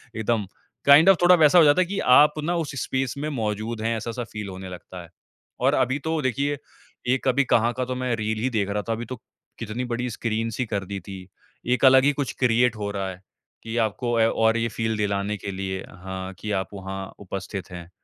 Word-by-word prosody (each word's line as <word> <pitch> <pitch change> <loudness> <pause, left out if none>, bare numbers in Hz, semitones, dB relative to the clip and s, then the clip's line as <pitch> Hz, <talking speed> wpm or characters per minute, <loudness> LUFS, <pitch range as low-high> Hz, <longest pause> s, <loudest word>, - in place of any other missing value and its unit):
एकदम 110 -1 0 0.4
kind 145 +6 +8
of 195 - +7
थोड़ा 180 +1 +8
वैसा 150 +4 +6
हो - - +8
जाता 145 +5 +5
है - - +2
कि 195 +2 -3 0.2
आप 150 0 +7
ना 175 +3 0
उस 145 - -6
स्पेस 130 -1 -1
में 150 +2 -3
मौजूद 110 -3 -3
हैं 115 +1 0
ऐसा-सा 115 +2 -4
फ़ील 105 -2 -5
होने 95 0 -8
लगता 90 0 -9
है। 85 - -15 0.5
और - - +3
अभी 130 +3 +1
तो 160 -1 0
देखिए 140 +2 0 0.6
एक 135 - -4
अभी 135 +2 +3
कहाँ 120 +1 +3
का 130 - 0
तो 130 0 -4
मैं 125 -2 -1
रील 110 0 -2
ही 130 - +2
देख 105 -5 -1
रहा 105 +1 -1
था - - +2
अभी 115 +1 -4
तो - - -7 0.4
कितनी 115 +2 -4
बड़ी 125 +1 -2
स्क्रीन 115 0 -2
ही 130 - +1
कर 100 -3 -3
दी 100 +1 -5
थी। 95 0 -9 0.5
एक 130 - +1
अलग 130 0 +7
ही 145 - +4
कुछ 135 - -3
क्रिएट 125 -1 +3
हो 100 -1 -3
रहा 100 -1 -3
है 90 0 -9 0.4
कि 115 +1 -4
आपको 115 +1 0
ए, 110 - +5
और 115 0 +2
ये 115 0 0
फ़ील 110 0 -2
दिलाने 100 0 -1
के 100 - -6
लिए 95 0 -4 0.2
हाँ 95 0 -6
कि 105 - -4
आप - - -8
वहाँ 95 0 -6
उपस्थित 95 -1 -6
हैं। 85 -1 -9
115 Hz, 225 wpm, -24 LUFS, 100-130 Hz, 0.6 s, kind